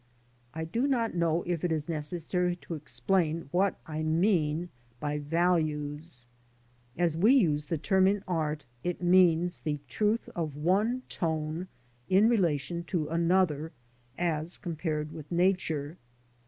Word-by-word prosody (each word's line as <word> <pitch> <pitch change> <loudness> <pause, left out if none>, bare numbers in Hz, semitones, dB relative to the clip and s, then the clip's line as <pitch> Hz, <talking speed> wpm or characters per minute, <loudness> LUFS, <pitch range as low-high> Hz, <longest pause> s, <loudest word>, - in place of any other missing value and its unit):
I 160 0 -3
do 230 - 0
not 240 -5 +1
know 170 -1 +1
if 175 -3 -2
it 175 - +1
is 155 -2 -1
necessary 175 +3 -1
to 175 - -8
explain 155 +4 0
I - - -13
what 190 +2 +1
I 155 0 -4
mean 165 0 +1 0.3
by 150 0 -2
values. 150 -3 -1 0.7
As 170 -2 +1
we 215 +11 +5
use 150 - +3
the 165 +2 -2
term 190 +6 +3
in 200 0 +1
art, 155 -5 -1 0.2
it 180 0 -3
means 175 -1 +4
the 150 -2 -1
j. 145 - -11
truth 210 - 0
of 155 -4 -3
one 205 - +1
tone 160 +1 -2 0.4
in 195 +4 +5
relation 170 -6 +1
to 160 -5 -2
another 165 -2 +1 0.4
as 165 -1 -1
compared 155 -4 -3
with 155 -1 -10
Nature. 170 -4 0
165 Hz, 140 wpm, -29 LUFS, 155-180 Hz, 0.7 s, we